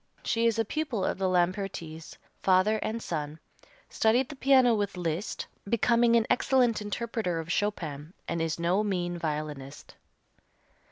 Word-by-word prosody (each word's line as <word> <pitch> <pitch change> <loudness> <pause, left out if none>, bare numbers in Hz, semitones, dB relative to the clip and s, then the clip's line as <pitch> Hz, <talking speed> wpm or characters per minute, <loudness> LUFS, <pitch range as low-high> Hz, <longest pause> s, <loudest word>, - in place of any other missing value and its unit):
She 230 0 +2
is 230 -1 +1
a 225 - +1
pupil 260 -6 -2
of - - -2
the 190 -1 +1
Lampertis, 175 -3 -2 0.2
father 190 +3 +3
and 225 +2 -3
son, 150 0 -4 0.5
studied 240 +4 +2
the 295 - -7
piano 260 -3 +5
with 205 -3 -1
Liszt, 170 +2 -3 0.2
becoming 235 +1 +3
an 230 -1 +4
excellent 245 -4 +2
interpreter 210 -4 -2
of 165 +1 -5
Chopin, 165 -7 -2 0.2
and 170 - -2
is 165 -1 -1
no 180 +5 +2
mean 175 -4 -1
violinist. 150 -3 -5
195 Hz, 145 wpm, -28 LUFS, 165-230 Hz, 0.5 s, piano